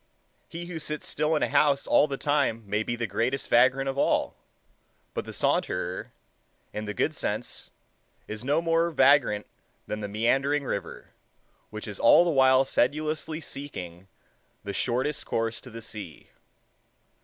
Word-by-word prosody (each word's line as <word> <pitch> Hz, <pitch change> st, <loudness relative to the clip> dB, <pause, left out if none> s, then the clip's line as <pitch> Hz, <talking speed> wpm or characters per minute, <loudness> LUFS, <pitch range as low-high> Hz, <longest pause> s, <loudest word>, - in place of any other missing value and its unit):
He 170 Hz, +1 st, -6 dB
who 170 Hz, -2 st, -6 dB
sits 150 Hz, 0 st, -5 dB
still 155 Hz, +2 st, 0 dB
in 150 Hz, -, +1 dB
a -, -, +1 dB
house 140 Hz, -2 st, +3 dB
all 150 Hz, -, +4 dB
the 135 Hz, -, -4 dB
time 140 Hz, -7 st, 0 dB
may 105 Hz, +2 st, 0 dB
be 120 Hz, +2 st, -2 dB
the 120 Hz, 0 st, -2 dB
greatest 115 Hz, +6 st, -1 dB
vagrant 130 Hz, +3 st, +4 dB
of 135 Hz, +1 st, -2 dB
all; -, -, +1 dB, 0.8 s
but -, -, -3 dB
the -, -, -7 dB
saunterer, -, -, -1 dB, 0.6 s
in 105 Hz, +1 st, -4 dB
the 105 Hz, -, -4 dB
good -, -, +1 dB
sense, -, -, -4 dB, 0.6 s
is 110 Hz, +1 st, -6 dB
no 145 Hz, +5 st, +1 dB
more 165 Hz, 0 st, +2 dB
vagrant 135 Hz, -8 st, +4 dB, 0.4 s
than 105 Hz, -, -4 dB
the 105 Hz, -1 st, -4 dB
meandering 135 Hz, +7 st, +1 dB
river, 100 Hz, -6 st, -5 dB, 0.6 s
which 110 Hz, +1 st, -7 dB
is 105 Hz, -2 st, -7 dB
all 145 Hz, -, +7 dB
the 170 Hz, -, +2 dB
while 130 Hz, -2 st, +5 dB
sedulously 155 Hz, +4 st, -1 dB
seeking 95 Hz, -, -7 dB, 0.6 s
the 100 Hz, -, -5 dB
shortest 130 Hz, +8 st, -1 dB
course 115 Hz, 0 st, -1 dB
to 125 Hz, -, -12 dB
the 115 Hz, -1 st, -9 dB
sea. 100 Hz, -8 st, -9 dB
130 Hz, 155 wpm, -27 LUFS, 110-150 Hz, 0.8 s, all